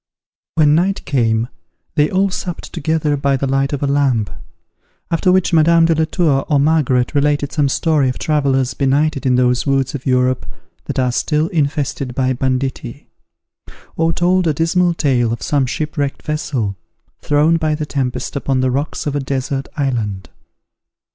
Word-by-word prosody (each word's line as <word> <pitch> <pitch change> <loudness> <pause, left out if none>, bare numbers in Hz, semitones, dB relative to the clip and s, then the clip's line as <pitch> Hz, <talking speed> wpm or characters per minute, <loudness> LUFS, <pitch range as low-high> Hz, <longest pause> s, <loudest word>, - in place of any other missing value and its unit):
When 150 -2 +4
night 185 +5 +1
came, 115 -4 +1 0.5
they 150 0 +2
all 190 +1 +1
supped 180 -2 -6
together 155 0 0
by 140 -1 +1
the 140 - -2
light 135 +1 0
of 145 -1 -3
a - - +3
lamp; 140 -7 +1 0.8
after 170 +2 +2
which 185 -1 +2
Madame 165 +1 +5
de 165 - +3
la 160 0 +1
Tour 155 -5 +1
or 145 -2 +3
Margaret 140 -4 +2
related 145 0 +1
some 145 -3 +1
story 150 -2 +1
of 125 - -4
travellers 135 -5 0
benighted 140 +1 +1
in 125 - +3
those 125 +1 +1
woods 135 -2 +1
of 140 -1 -6
Europe 125 -8 +1 0.4
that - - -5
are 125 -1 +1
still 155 +5 0
infested 140 -4 -2
by 130 -1 +1
banditti; 130 0 -3 0.9
or 165 0 +1
told 180 +1 +1
a 155 - +1
dismal 170 +2 +1
tale 125 -7 +1
of 115 - -4
some 140 -3 +1
shipwrecked 145 +1 -3
vessel, 140 -9 -2 0.5
thrown 150 +3 +3
by 155 -2 0
the 150 0 -3
tempest 130 -3 -3
upon 135 -2 0
the 130 0 +1
rocks 140 +4 -3
of 145 -1 -2
a - - +1
desert 135 0 -3
island. 110 - -2
140 Hz, 165 wpm, -17 LUFS, 130-155 Hz, 0.9 s, Madame